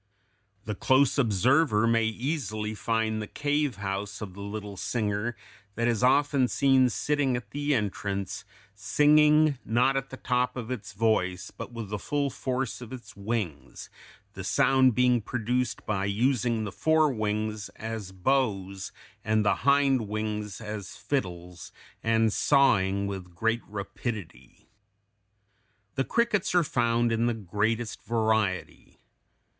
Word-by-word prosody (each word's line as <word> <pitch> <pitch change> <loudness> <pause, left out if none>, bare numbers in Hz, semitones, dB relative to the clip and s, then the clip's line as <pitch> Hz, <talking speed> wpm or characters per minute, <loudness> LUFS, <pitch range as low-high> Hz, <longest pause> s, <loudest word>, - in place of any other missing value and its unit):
The 105 - -2
close 130 +7 +3
observer 115 - +3
may 115 -1 +3
easily 110 -3 -2
find 110 0 -1
the 105 - -5
cave 145 -1 -1
house 100 +1 -4
of 100 -4 -7
the 100 - -10
little 100 0 -6
singer 105 +3 -2 0.4
that 115 +1 0
is 115 -2 +1
often 135 +1 +3
seen 130 -1 +3
sitting 135 +4 0
at 115 -4 -9
the 145 0 0
entrance, 100 -2 -3 0.3
singing, 150 +6 +4
not 125 +4 +2
at 135 0 -2
the 130 - -8
top 125 0 0
of 120 0 -5
its 105 -7 -5
voice, 95 -4 0
but - - -8
with 115 -4 -6
the 105 0 -3
full 140 +5 -1
force 130 -1 -3
of 120 -1 -9
its 125 -2 -10
wings, 100 -7 -4 0.4
the - - -7
sound 130 -3 +3
being 125 -1 +3
produced 125 +3 -2
by 100 -3 -1
using 115 +2 +1
the 105 - -4
fore 155 +1 +2
wings, 110 -1 -2
as 110 -3 -6
bows 95 -3 -1 0.3
and 110 0 +1
the - - +3
hind 135 -5 +3
wings 105 -1 -3
as 105 -3 -6
fiddles, 90 -8 -4 0.3
and 115 -1 +2
sawing 100 -9 +3
with 95 -3 -6
great 115 +5 0
rapidity. 100 - -7 1.3
The 135 - -1
crickets 230 -6 +1
are 175 - +5
found 120 -3 +1
in 115 +1 +1
the 120 - 0
greatest 110 +3 -2
variety. 110 -4 -1
115 Hz, 135 wpm, -27 LUFS, 105-130 Hz, 1.3 s, are